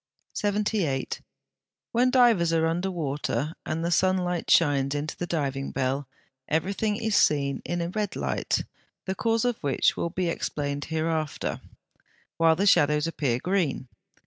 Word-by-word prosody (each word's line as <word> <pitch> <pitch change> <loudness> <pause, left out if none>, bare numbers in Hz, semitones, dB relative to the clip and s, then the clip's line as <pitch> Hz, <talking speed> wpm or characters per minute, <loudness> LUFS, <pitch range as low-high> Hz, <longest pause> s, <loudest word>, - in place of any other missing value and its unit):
78. 205 -9 -1 0.7
When 245 +2 +3
divers 235 -10 +4
are 160 0 +3
under 175 +4 0
water, 150 -2 -2
and 165 +1 -2
the 170 - 0
sunlight 180 0 +1
shines 140 -3 +3
into 150 +2 -3
the 175 - -4
diving 140 -5 -2
bell, 135 +1 -1 0.4
everything 195 +7 0
is 220 -1 -1
seen 140 -2 +2
in 175 0 -2
a 170 - -2
red 205 +1 -2
light - - -1 0.4
(the 190 - -1
cause 225 +3 0
of 245 -2 +1
which 140 -2 +1
will 170 - -2
be 180 +1 -2
explained 145 -3 -2
hereafter), 160 -1 -2 0.8
while 165 -1 +5
the 195 +5 0
shadows 150 -5 +4
appear 140 -7 0
green. 160 -5 -1
165 Hz, 145 wpm, -26 LUFS, 145-190 Hz, 0.8 s, while